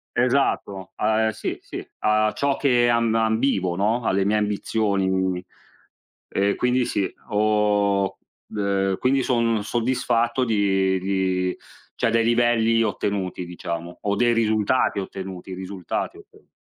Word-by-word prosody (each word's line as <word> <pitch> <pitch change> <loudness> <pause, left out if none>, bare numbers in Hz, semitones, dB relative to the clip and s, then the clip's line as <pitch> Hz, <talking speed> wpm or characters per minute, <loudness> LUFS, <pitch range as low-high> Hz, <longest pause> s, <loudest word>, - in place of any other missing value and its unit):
Esatto. 120 -7 0
A 110 +1 +1
e 110 - -1
sì, 110 - -4
sì. - - -8
A 105 0 +2
ciò 140 -1 0
che 120 -4 +3
amb 115 -1 +2
ambivo, 110 -5 +1
no, 110 +5 0
alle 95 -2 +1
mie 105 +1 +2
ambizioni. 95 -3 0 0.9
E 100 +1 +1
quindi 125 0 +1
sì, 100 -2 -1 0.2
ho 105 -2 +1 0.4
ehm, 95 -1 0
quindi 135 +1 +2
son 115 -4 +1
soddisfatto 120 +1 0
di 95 -4 +1
di 95 -1 -1 0.4
cioè - - +1
dei 115 0 +2
livelli 115 -1 +3
ottenuti, 100 -4 -2
diciamo; 85 0 -6
o 100 0 0
dei 120 +2 +3
risultati 110 0 +1
ottenuti, 95 -1 -6
i - - -4
risultati 95 -1 -4
otten - - -18
105 Hz, 130 wpm, -23 LUFS, 95-115 Hz, 0.9 s, che